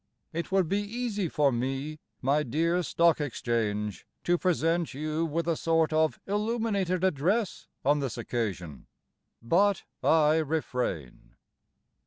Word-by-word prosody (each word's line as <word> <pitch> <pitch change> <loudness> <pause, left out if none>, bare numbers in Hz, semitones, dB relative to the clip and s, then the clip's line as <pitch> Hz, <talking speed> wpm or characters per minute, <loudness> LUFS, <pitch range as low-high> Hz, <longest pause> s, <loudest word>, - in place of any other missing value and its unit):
It 170 +3 -3
would 190 -3 +3
be 200 +5 +1
easy 210 -3 -2
for 145 -2 +2
me, 135 +5 -3 0.2
my 140 +3 +3
dear 165 +6 +1
Stock 170 -2 +3
Exchange, 110 -6 -2 0.2
To 175 - +3
present 170 -3 +1
you 155 +3 -1
With 165 +2 -2
a 165 - +2
sort 165 0 +1
of 155 0 +2
illuminated 205 -3 0
address 190 +5 0 0.2
on 145 +2 +4
this 135 -5 -3
occasion; 95 - -4 0.6
But 195 - +3 0.2
I 155 -1 +4
refrain. 125 - -3
160 Hz, 125 wpm, -28 LUFS, 135-180 Hz, 0.6 s, on